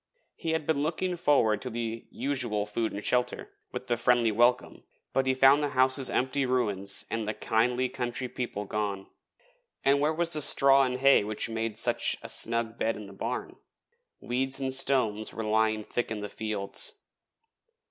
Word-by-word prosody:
He 165 Hz, -1 st, -3 dB
had 160 Hz, -2 st, -1 dB
been 150 Hz, -2 st, 0 dB
looking 170 Hz, +4 st, -1 dB
forward 140 Hz, -11 st, +2 dB
to 130 Hz, -, -5 dB
the 115 Hz, -1 st, -5 dB
usual 120 Hz, -7 st, -2 dB
food 110 Hz, +2 st, -2 dB
and 100 Hz, -, -6 dB
shelter, 125 Hz, 0 st, 0 dB, 0.2 s
with -, -, -6 dB
the 120 Hz, -, 0 dB
friendly 120 Hz, -1 st, +3 dB
welcome, 120 Hz, +3 st, +1 dB, 0.3 s
but 135 Hz, 0 st, +1 dB
he 130 Hz, -, +2 dB
found 135 Hz, +2 st, +6 dB
the 145 Hz, -, 0 dB
houses 130 Hz, +1 st, +3 dB
empty 130 Hz, +2 st, 0 dB
ruins 105 Hz, -7 st, 0 dB
and 115 Hz, -2 st, -2 dB
the 105 Hz, -, -2 dB
kindly 125 Hz, +3 st, +1 dB
country 125 Hz, 0 st, -4 dB
people 120 Hz, -5 st, -5 dB
gone. 100 Hz, -1 st, -3 dB, 0.8 s
And 140 Hz, +1 st, +4 dB
where 150 Hz, +2 st, +2 dB
was 170 Hz, +1 st, 0 dB
the 155 Hz, -, -1 dB
straw 135 Hz, -1 st, +5 dB
and 125 Hz, 0 st, -2 dB
hay 135 Hz, -3 st, +5 dB
which 105 Hz, +2 st, -3 dB
made 115 Hz, -1 st, -3 dB
such -, -, +1 dB
a -, -, -7 dB
snug 115 Hz, 0 st, 0 dB
bed 115 Hz, -, 0 dB
in 105 Hz, -, -8 dB
the 100 Hz, -, -12 dB
barn? 115 Hz, +6 st, -5 dB, 0.6 s
Weeds 130 Hz, +2 st, -1 dB
and 135 Hz, -1 st, -2 dB
stones 120 Hz, -6 st, +1 dB
were 115 Hz, -, -4 dB
lying 110 Hz, 0 st, +1 dB
thick 120 Hz, +3 st, -3 dB
in 110 Hz, -2 st, -4 dB
the 105 Hz, -, -5 dB
fields. 100 Hz, -, -2 dB
120 Hz, 180 wpm, -28 LUFS, 110-135 Hz, 0.8 s, found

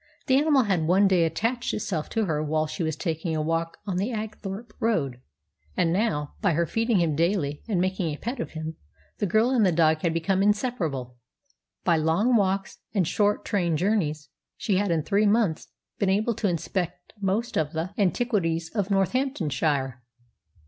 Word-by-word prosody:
The 260 Hz, -, +3 dB
animal 285 Hz, -1 st, +4 dB
had 185 Hz, -7 st, 0 dB
one 195 Hz, +3 st, +5 dB
day 180 Hz, -3 st, +4 dB
attached 230 Hz, +10 st, -1 dB
itself 170 Hz, -7 st, -3 dB
to 225 Hz, -2 st, 0 dB
her 155 Hz, -4 st, -1 dB
while 155 Hz, +1 st, 0 dB
she 155 Hz, +2 st, -5 dB
was 160 Hz, -2 st, 0 dB
taking 160 Hz, 0 st, -2 dB
a 155 Hz, -, 0 dB
walk 165 Hz, +1 st, -1 dB
on 190 Hz, -3 st, -2 dB
the 200 Hz, +7 st, -1 dB
Apethorpe 215 Hz, 0 st, -6 dB
road; 150 Hz, -, 0 dB, 0.6 s
and 165 Hz, -1 st, +2 dB
now, 155 Hz, -8 st, 0 dB
by 200 Hz, -5 st, +3 dB
her 170 Hz, +2 st, +2 dB
feeding 225 Hz, +3 st, +1 dB
him 165 Hz, -4 st, +1 dB
daily 165 Hz, -3 st, 0 dB
and 200 Hz, -6 st, 0 dB
making 185 Hz, -2 st, 0 dB
a 150 Hz, -, -5 dB
pet 240 Hz, -, -4 dB
of -, -, -4 dB
him, 160 Hz, 0 st, -5 dB, 0.4 s
the 205 Hz, -, +1 dB
girl 220 Hz, +7 st, +3 dB
and 245 Hz, -4 st, +3 dB
the 185 Hz, -, +4 dB
dog 160 Hz, -1 st, +3 dB
had 170 Hz, -, +1 dB
become 165 Hz, +4 st, +1 dB
inseparable. 190 Hz, -, 0 dB, 0.7 s
By 170 Hz, -2 st, +3 dB
long 165 Hz, +11 st, +2 dB
walks 195 Hz, -2 st, 0 dB, 0.2 s
and 185 Hz, -5 st, +2 dB
short 205 Hz, +3 st, +1 dB
train 175 Hz, -6 st, +1 dB
journeys 160 Hz, -6 st, 0 dB, 0.3 s
she 200 Hz, -4 st, 0 dB
had, 200 Hz, 0 st, +1 dB
in 165 Hz, -3 st, +1 dB
three 205 Hz, +4 st, +2 dB
months, 205 Hz, -7 st, +1 dB, 0.3 s
been 200 Hz, -, +2 dB
able 215 Hz, +5 st, +2 dB
to 210 Hz, -2 st, 0 dB
inspect 175 Hz, +1 st, -3 dB
most 215 Hz, +5 st, -1 dB
of 155 Hz, 0 st, 0 dB
the 165 Hz, +3 st, -2 dB
antiquities 180 Hz, -6 st, 0 dB
of 205 Hz, -3 st, -1 dB
Northamptonshire. 160 Hz, -, 0 dB
185 Hz, 180 wpm, -26 LUFS, 160-210 Hz, 0.7 s, one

